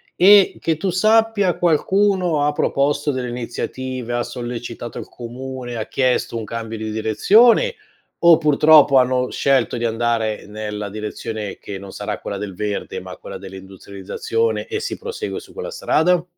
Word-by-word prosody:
e, 195 Hz, +1 st, +6 dB
che 165 Hz, -, 0 dB
tu 190 Hz, +5 st, -2 dB
sappia, 215 Hz, 0 st, +3 dB
qualcuno 180 Hz, -1 st, +2 dB
ha 150 Hz, -, +2 dB
proposto 145 Hz, 0 st, 0 dB
delle 130 Hz, -2 st, -3 dB
iniziative? 125 Hz, +1 st, -5 dB
Ha 120 Hz, 0 st, 0 dB
sollecitato 120 Hz, -1 st, -6 dB
il -, -, -7 dB
comune? 125 Hz, +1 st, -7 dB
Ha 110 Hz, -1 st, -4 dB
chiesto 130 Hz, -2 st, 0 dB
un 115 Hz, -, -4 dB
cambio 115 Hz, +1 st, -5 dB
di 110 Hz, 0 st, -4 dB
direzione 220 Hz, -, +4 dB, 0.5 s
o 170 Hz, -2 st, +8 dB
purtroppo 150 Hz, -2 st, +5 dB
hanno 125 Hz, 0 st, +2 dB
scelto 135 Hz, -3 st, +1 dB
di 120 Hz, -, -2 dB
andare 115 Hz, -1 st, -1 dB
nella 105 Hz, -1 st, -5 dB
direzione 105 Hz, 0 st, -5 dB
che 100 Hz, -, -7 dB
non 95 Hz, 0 st, -10 dB
sarà -, -, -5 dB
quella 100 Hz, -, -5 dB
del 100 Hz, -1 st, -5 dB
verde, 105 Hz, +1 st, -4 dB
ma -, -, -9 dB
quella -, -, -8 dB
dell'industrializzazione, 95 Hz, -, -4 dB
e 435 Hz, -3 st, -3 dB
si -, -, -4 dB
prosegue 465 Hz, 0 st, -5 dB
su -, -, -15 dB
quella 485 Hz, +1 st, -6 dB
strada? 175 Hz, -, +2 dB
125 Hz, 155 wpm, -20 LUFS, 110-170 Hz, 0.5 s, o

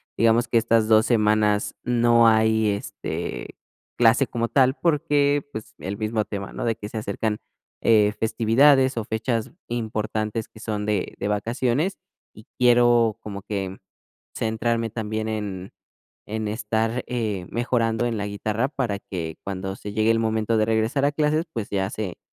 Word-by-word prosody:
digamos 115 Hz, +1 st, +3 dB
que 120 Hz, -, +2 dB
estas 115 Hz, -1 st, +3 dB
2 110 Hz, +1 st, +5 dB
semanas 105 Hz, -2 st, +2 dB
no 120 Hz, -1 st, +4 dB
hay, 110 Hz, -1 st, +3 dB
este, 100 Hz, 0 st, -5 dB, 0.4 s
clase 120 Hz, +3 st, +5 dB
como 115 Hz, 0 st, -2 dB
tal 130 Hz, 0 st, +3 dB
porque, 145 Hz, -3 st, +1 dB
pues, 110 Hz, -, -8 dB
el 95 Hz, +2 st, -5 dB
mismo 110 Hz, 0 st, -1 dB
tema, 100 Hz, -1 st, -6 dB
¿no?, -, -, -4 dB
de 115 Hz, -1 st, +1 dB
que 105 Hz, -, -8 dB
se 110 Hz, -, -6 dB
acercan, 105 Hz, 0 st, -2 dB, 0.4 s
eh, 105 Hz, -2 st, +4 dB
festividades 130 Hz, +4 st, +4 dB
o 115 Hz, -, 0 dB
fechas 110 Hz, +1 st, -2 dB, 0.2 s
importantes 110 Hz, -1 st, -2 dB
que 110 Hz, -, -16 dB
son 105 Hz, -2 st, -3 dB
de 105 Hz, -3 st, -1 dB
de -, -, -2 dB
vacaciones, 120 Hz, -, 0 dB, 0.3 s
y 110 Hz, -, -15 dB
quiero 120 Hz, -2 st, +4 dB
como 100 Hz, -2 st, -7 dB
que 95 Hz, -2 st, -4 dB, 0.6 s
centrarme 115 Hz, 0 st, -1 dB
también 110 Hz, 0 st, -3 dB
en 100 Hz, -4 st, -4 dB, 0.5 s
en 110 Hz, 0 st, -3 dB
estar, 110 Hz, +2 st, -1 dB
eh, 110 Hz, -7 st, -2 dB
mejorando 120 Hz, -1 st, 0 dB
en 115 Hz, -2 st, -1 dB
la 100 Hz, -, -2 dB
guitarra 110 Hz, +5 st, -1 dB
para 120 Hz, -9 st, -2 dB
que 80 Hz, -5 st, -6 dB
cuando 95 Hz, 0 st, -4 dB
se 105 Hz, -, -7 dB
llegue 110 Hz, +1 st, +2 dB
el 115 Hz, -, +3 dB
momento 110 Hz, 0 st, 0 dB
de 110 Hz, -, +2 dB
regresar 115 Hz, +5 st, +1 dB
a 145 Hz, -, +1 dB
clases, 155 Hz, +3 st, +1 dB
pues, 115 Hz, -4 st, -4 dB
ya 95 Hz, -1 st, 0 dB
se 100 Hz, -5 st, -5 dB
110 Hz, 160 wpm, -24 LUFS, 105-120 Hz, 0.6 s, 2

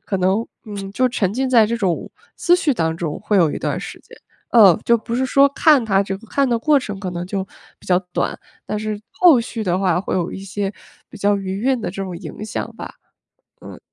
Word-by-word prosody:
可 195 Hz, -, -2 dB
能 190 Hz, +5 st, +1 dB, 0.2 s
嗯， 200 Hz, -2 st, -7 dB
就 255 Hz, +4 st, +2 dB
沉 200 Hz, -6 st, -1 dB
浸 260 Hz, +4 st, -1 dB
在 230 Hz, -4 st, +6 dB
这 230 Hz, +2 st, -1 dB
种 190 Hz, -7 st, -1 dB, 0.3 s
思 350 Hz, -, +3 dB
绪 325 Hz, -5 st, +2 dB
当 160 Hz, -7 st, -1 dB
中 165 Hz, -3 st, -4 dB
会 210 Hz, 0 st, 0 dB
有 165 Hz, -5 st, +4 dB
一 -, -, -4 dB
段 -, -, -2 dB
儿 -, -, -4 dB
时 -, -, -8 dB
间。 -, -, -17 dB, 0.3 s
呃， 200 Hz, -8 st, +7 dB
就 235 Hz, -, +4 dB
不 230 Hz, +1 st, -4 dB
是 260 Hz, +1 st, 0 dB
说 275 Hz, +1 st, +5 dB
看 280 Hz, -3 st, +4 dB
他 195 Hz, -3 st, +2 dB
这 195 Hz, -1 st, -2 dB
个 210 Hz, +2 st, -17 dB
看 280 Hz, -1 st, +1 dB
的 235 Hz, -, +2 dB
过 290 Hz, +5 st, +3 dB
程 205 Hz, -6 st, -6 dB
可 185 Hz, -2 st, -4 dB
能 175 Hz, 0 st, -5 dB
就 195 Hz, +1 st, -2 dB, 0.4 s
比 -, -, -18 dB
较 180 Hz, -1 st, +3 dB
短， -, -, -1 dB, 0.3 s
但 210 Hz, -, -3 dB
是 215 Hz, -1 st, -4 dB
后 325 Hz, -9 st, +5 dB
续 230 Hz, -2 st, -5 dB
的 180 Hz, -1 st, +1 dB
话 185 Hz, -2 st, +1 dB
会 195 Hz, -, -3 dB
有 175 Hz, -2 st, -1 dB
一 -, -, -7 dB
些 195 Hz, +1 st, -4 dB, 0.4 s
比 220 Hz, -, -12 dB
较 205 Hz, 0 st, +2 dB
余 190 Hz, 0 st, -4 dB
韵 260 Hz, -2 st, +1 dB
的 -, -, -3 dB
这 195 Hz, -, -7 dB
种 185 Hz, -3 st, -5 dB
影 205 Hz, -, -8 dB
响 220 Hz, -, -5 dB
吧。 -, -, -8 dB, 0.7 s
嗯。 -, -, -11 dB
205 Hz, 260 characters per minute, -20 LUFS, 190-235 Hz, 0.7 s, 呃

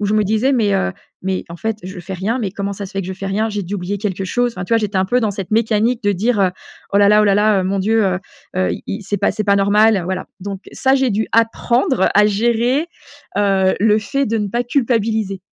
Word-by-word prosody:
je 205 Hz, 0 st, 0 dB
me 215 Hz, -, +3 dB
disais: 220 Hz, +7 st, +1 dB
«Mais, 215 Hz, -6 st, +2 dB
heu, 190 Hz, 0 st, 0 dB, 0.3 s
mais 190 Hz, 0 st, -2 dB
en 170 Hz, -, -8 dB
fait 220 Hz, +3 st, -3 dB
je 185 Hz, 0 st, -8 dB
fais 190 Hz, +2 st, -8 dB
rien, 200 Hz, +7 st, -2 dB
mais 210 Hz, -6 st, -2 dB
comment 200 Hz, +1 st, -4 dB
ça 200 Hz, -, -6 dB
se 190 Hz, -, -9 dB
fait 195 Hz, -, -2 dB
que 185 Hz, -, -6 dB
je 190 Hz, -, -4 dB
fais 195 Hz, -, -8 dB
rien? 215 Hz, +3 st, 0 dB
J'ai 205 Hz, -1 st, -3 dB
dû 190 Hz, +4 st, -5 dB
oublier 190 Hz, +2 st, -3 dB
quelque 195 Hz, -2 st, -3 dB
chose». 245 Hz, +4 st, 0 dB
Enfin, 180 Hz, -, -4 dB
tu 230 Hz, -, -5 dB
vois -, -, +4 dB
j'étais 205 Hz, -3 st, -1 dB
un 190 Hz, -, +1 dB
peu 250 Hz, +5 st, +2 dB
dans 215 Hz, -2 st, 0 dB
cette 195 Hz, -2 st, -6 dB
mécanique 225 Hz, +2 st, +1 dB
de 205 Hz, -1 st, +2 dB
dire: 210 Hz, +3 st, 0 dB
«Heu, 190 Hz, -2 st, +3 dB, 0.4 s
oh 200 Hz, -, +4 dB
là 200 Hz, 0 st, +5 dB
là 210 Hz, 0 st, +5 dB
oh -, -, +3 dB
là 200 Hz, -1 st, +3 dB
là, 205 Hz, -2 st, +3 dB
mon 195 Hz, +1 st, -1 dB
Dieu, 220 Hz, +3 st, +2 dB
heu 185 Hz, -2 st, 0 dB, 0.4 s
heu, 185 Hz, -, +1 dB
il -, -, -6 dB
il 205 Hz, +2 st, -4 dB
c'est 205 Hz, +1 st, -2 dB
pas 200 Hz, +1 st, +1 dB
c'est 215 Hz, 0 st, -3 dB
pas 200 Hz, -1 st, +3 dB
normal». 205 Hz, 0 st, +4 dB
Voilà, 185 Hz, +1 st, -3 dB
donc 195 Hz, 0 st, -6 dB
ça 265 Hz, 0 st, +2 dB
j'ai 265 Hz, -1 st, +2 dB
dû 215 Hz, +2 st, 0 dB
apprendre 230 Hz, 0 st, +2 dB
à 210 Hz, +1 st, +6 dB
gérer, 235 Hz, +8 st, +1 dB, 0.5 s
heu, 195 Hz, -2 st, +2 dB
le 215 Hz, 0 st, +4 dB
fait 275 Hz, +6 st, -1 dB
de 225 Hz, 0 st, -1 dB
ne 205 Hz, -1 st, -2 dB
pas 240 Hz, +4 st, -1 dB
culpabiliser. 225 Hz, -6 st, 0 dB
205 Hz, 265 wpm, -18 LUFS, 195-225 Hz, 0.5 s, à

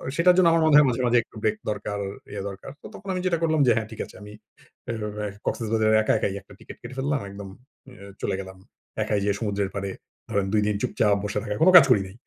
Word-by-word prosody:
সেটার 180 Hz, +1 st, +5 dB
জন্য 180 Hz, -2 st, +5 dB
আমার 165 Hz, 0 st, +3 dB
মনে 155 Hz, -2 st, +5 dB
হয় 150 Hz, -, +7 dB
মাঝে, 125 Hz, +1 st, -1 dB
মাঝে 120 Hz, 0 st, +3 dB
একটু -, -, -25 dB
ব্রেক 215 Hz, -, +1 dB
দরকার 105 Hz, 0 st, -4 dB, 0.3 s
ইয়ে 100 Hz, -1 st, -4 dB
দরকার। 100 Hz, +7 st, -10 dB
তো -, -, -9 dB
তখন 195 Hz, -, -12 dB
আমি 180 Hz, -, -2 dB
যেটা 170 Hz, -2 st, +1 dB
করলাম 160 Hz, -1 st, +2 dB
যে, -, -, +6 dB
হ্যাঁ, 110 Hz, -1 st, -2 dB
ঠিক 110 Hz, -, -10 dB
আছে। -, -, -17 dB
আমি 105 Hz, 0 st, -10 dB, 0.6 s
অ্যা 105 Hz, -2 st, -4 dB, 0.2 s
কক্সেস 115 Hz, -, -2 dB
বাজারে 110 Hz, -1 st, +3 dB
একা -, -, +1 dB
একাই 100 Hz, -, -1 dB
যাব 100 Hz, -, -6 dB
একটা -, -, -16 dB
টিকেট -, -, -12 dB
কেটে 125 Hz, +2 st, -9 dB
ফেললাম। 140 Hz, +1 st, 0 dB
একদম 100 Hz, 0 st, -9 dB, 0.4 s
অ্যা 100 Hz, -6 st, -13 dB, 0.2 s
চলে 100 Hz, -, -1 dB
গেলাম। 95 Hz, 0 st, -11 dB, 0.5 s
একাই 105 Hz, -1 st, 0 dB
যেয়ে 100 Hz, 0 st, +1 dB
সমুদ্রের 100 Hz, -3 st, -2 dB
পাড়ে 100 Hz, -1 st, -3 dB, 0.4 s
ধরেন 100 Hz, -1 st, 0 dB
২ 105 Hz, -, +3 dB
দিন 105 Hz, -, 0 dB
চুপচাপ 105 Hz, -2 st, +1 dB
বসে 105 Hz, +1 st, -2 dB
থাকা। 105 Hz, -, -3 dB
কোন 185 Hz, -, +7 dB
কাজ 140 Hz, -, +9 dB
করি 100 Hz, -, +5 dB
নাই। 95 Hz, -, -13 dB
105 Hz, 245 wpm, -25 LUFS, 100-135 Hz, 0.6 s, কাজ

